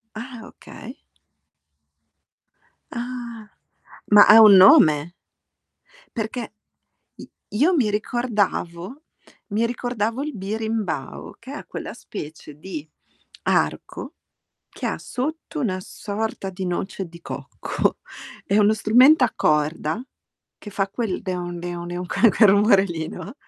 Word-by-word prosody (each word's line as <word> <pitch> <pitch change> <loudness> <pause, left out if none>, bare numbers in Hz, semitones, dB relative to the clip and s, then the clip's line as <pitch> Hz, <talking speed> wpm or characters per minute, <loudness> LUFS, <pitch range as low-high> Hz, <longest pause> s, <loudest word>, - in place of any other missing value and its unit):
Ah, 240 +1 -8
okay. - - -12 1.9
Ah. 235 -3 -7 0.6
Ma 205 0 +9
ha 220 +1 +9
un 210 -2 +9
nome? 160 -3 +6 1.0
Perché 225 0 -4 0.6
i - - -12 0.2
io 305 - +2
mi 235 -9 +2
ricordavo 210 - -2 0.5
mi 230 +2 +1
ricordavo 240 0 -2
il 300 -4 -5
birimbao, 210 -6 -4
che - - -11
è - - -8
quella - - -7
specie 150 -1 -9
di 155 -2 -8 0.5
arco - - -1 0.5
che - - -8
ha - - -2
sotto 310 +4 -5
una 195 -9 -1
sorta 205 0 -5
di 190 0 -5
noce 190 +1 -4
di 170 0 -14
cocco. - - -3 0.5
È 200 - 0
uno 210 +1 +4
strumento 250 +8 +5
a 235 - +1
corda, 150 +4 0 0.6
che 210 - -10
fa 195 -1 -1
quel 205 -3 -3
"deon 180 -2 -4
deon 175 0 -6
deon" 175 +1 -5
quel 220 +5 +3
quel 215 -3 +6
rumore 200 0 +5
lì, 165 -4 -4
no, 210 - -8
210 Hz, 120 wpm, -22 LUFS, 180-235 Hz, 1.9 s, Ma